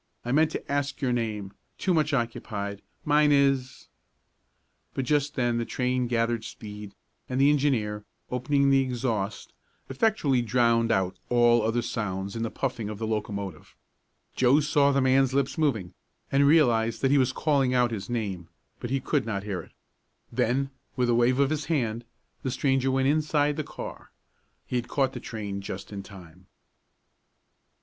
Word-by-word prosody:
I 120 - -2
meant 155 +3 +4
to 155 - -6
ask 140 -1 -1
your 130 -3 0
name 105 -4 -3 0.2
too 185 - +1
much 155 -2 +2
occupied 110 -5 -3 0.2
mine 150 -1 +4
is 135 -2 +1 0.5
" - - -46
But 135 - -1
just 150 +1 +1
then 120 -2 +1
the - - 0
train 125 0 -1
gathered 115 -1 0
speed 105 -2 -9 0.3
and 130 0 -1
the 140 +2 +6
engineer, 115 -8 0 0.3
opening 140 +2 +2
the 135 0 +5
exhaust, 115 -5 -3 0.4
effectually 140 - +2
drowned 115 0 +2
out 95 -4 0
all 120 -1 +4
other 115 +2 0
sounds 100 -3 -3
in 115 - -3
the 115 - -1
puffing 120 -5 -3
of 105 - -5
the 110 - -3
locomotive. 100 -5 -4 0.6
Joe 130 +3 +4
saw 145 -1 +3
the 140 0 +2
man's 130 0 +3
lips 140 -1 +1
moving, 110 - 0 0.4
and 140 +1 +4
realized 115 -7 +3
that 135 - +3
he 145 - +5
was 130 -1 +2
calling 135 -3 +1
out 125 -1 +3
his 100 -2 -5
name, 100 -8 -3 0.3
but 120 - -5
he 135 +1 0
could 135 -1 -1
not 100 -3 -2
hear 100 -4 -3
it. - - -17 0.6
Then, 135 +4 0 0.2
with 125 -1 +1
a - - +4
wave 120 +2 +3
of 140 +1 +3
his 155 -2 -1
hand 120 -7 -1 0.4
the 130 - -2
stranger 135 0 +1
went 130 0 +2
inside 150 0 +2
the 155 - -2
car. - - -8 0.6
He 125 - -2
had 120 - -3
caught 135 -2 0
the - - -5
train 100 -3 -5
just 100 +1 -7
in 100 - -5
time. 90 -2 -14
125 Hz, 170 wpm, -27 LUFS, 110-140 Hz, 0.6 s, the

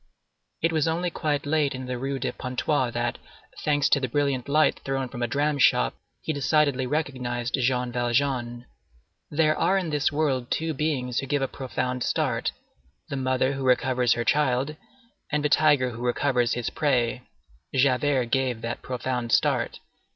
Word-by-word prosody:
It 165 - +3
was 160 -1 +1
only 170 +2 0
quite 150 -3 -1
late 145 -2 +1
in 130 0 -6
the 125 0 -3
Rue 135 +2 -3
de 130 - -2
Pontoise, 125 0 -1
that, 120 0 -1 0.4
thanks 145 -1 +2
to 140 - +4
the 130 - -1
brilliant 140 0 -1
light 155 +2 +3
thrown 135 -1 -2
from 120 - -7
a 120 - +1
dram 145 +3 0
shop, - - +4 0.3
he 160 - -1
decidedly 140 -2 +2
recognized 125 -5 -2
Jean 125 -1 +1
Valjean. 120 0 -1 0.6
There 155 0 +2
are 195 - +2
in 180 -4 -2
this 150 -1 +1
world 140 -5 0
two 160 0 -1
beings 135 -5 -1
who 135 - -4
give 145 0 0
a - - +1
profound 125 -1 -3
start,—the 65 - -4
mother 130 0 +1
who 135 0 -4
recovers 125 -1 +3
her 120 - -2
child 140 +1 +1 0.6
and 150 -1 0
the - - +3
tiger 145 -4 +4
who 115 0 -8
recovers 125 -1 +1
his 120 -2 -2
prey. 125 -4 +1 0.5
Javert 130 -1 +2
gave 130 -4 0
that 115 +1 -4
profound 125 -1 -3
start. - - +2
130 Hz, 165 wpm, -26 LUFS, 125-145 Hz, 0.6 s, to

